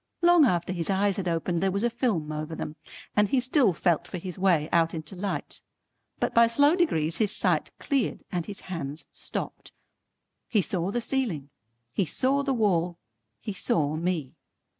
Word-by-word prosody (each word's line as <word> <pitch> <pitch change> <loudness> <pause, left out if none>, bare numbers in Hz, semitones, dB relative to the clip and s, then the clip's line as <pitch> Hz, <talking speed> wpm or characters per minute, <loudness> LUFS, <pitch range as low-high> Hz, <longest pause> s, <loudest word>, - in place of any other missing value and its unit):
Long 345 -3 +7
after 180 -4 0
his 170 -3 -2
eyes 200 +1 +2
had 190 -2 -2
opened, 170 0 0
there 195 - +2
was 200 +3 -1
a 240 - +3
film 215 - -1
over 155 +1 -4
them 150 - -5 0.4
and 210 -1 +3
he 270 - +3
still 255 -3 +3
felt 170 -1 +1
for 185 - -5
his 180 +1 -6
way 175 -6 +3
out 165 0 +2
into 160 +3 -6
light. 195 +2 -3 0.6
But - - -1
by 235 0 +6
slow 285 +7 +4
degrees 165 - +1
his 210 -3 +3
sight - - +2
cleared 275 -6 -1
and 175 -3 -2
his 205 -1 -7
hands 160 -5 -5
stopped. - - -6 0.8
He 220 - +3
saw 180 0 -2
the 240 +4 -1
ceiling, 215 - -2 0.4
he 195 - +1
saw 265 - +1
the 280 -1 -1
wall, 180 -8 +1 0.4
he 210 - -4
saw 155 -5 +1
me. 165 -4 -2
185 Hz, 180 wpm, -27 LUFS, 165-230 Hz, 0.8 s, Long